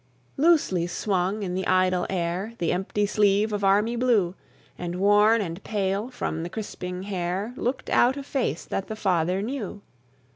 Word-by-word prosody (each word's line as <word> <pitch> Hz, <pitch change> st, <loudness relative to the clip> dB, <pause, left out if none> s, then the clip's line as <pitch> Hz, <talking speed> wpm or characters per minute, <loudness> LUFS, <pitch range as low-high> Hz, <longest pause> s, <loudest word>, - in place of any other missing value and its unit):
Loosely 275 Hz, -, +3 dB
swung 190 Hz, +2 st, -1 dB
in 180 Hz, -2 st, -3 dB
the 190 Hz, 0 st, -2 dB
idle 185 Hz, -1 st, +2 dB
air 185 Hz, +4 st, -2 dB
The 170 Hz, -, 0 dB
empty 195 Hz, +3 st, 0 dB
sleeve 210 Hz, +1 st, +2 dB
of 205 Hz, -1 st, -2 dB
army 205 Hz, +4 st, +3 dB
blue; 230 Hz, -8 st, +2 dB, 0.4 s
And 175 Hz, 0 st, -5 dB
worn 205 Hz, +4 st, +4 dB
and 175 Hz, 0 st, -5 dB
pale, 200 Hz, +2 st, -1 dB
from 160 Hz, -10 st, -3 dB
the 170 Hz, -, -4 dB
crisping 180 Hz, -3 st, -5 dB
hair, 190 Hz, +3 st, -3 dB
Looked 260 Hz, +1 st, -2 dB
out 255 Hz, +3 st, +3 dB
a 280 Hz, -, -5 dB
face 270 Hz, -2 st, -2 dB
that 195 Hz, -, -3 dB
the 220 Hz, -, -5 dB
father 185 Hz, -2 st, +1 dB
knew. 220 Hz, -4 st, -5 dB
195 Hz, 160 wpm, -25 LUFS, 180-220 Hz, 0.4 s, worn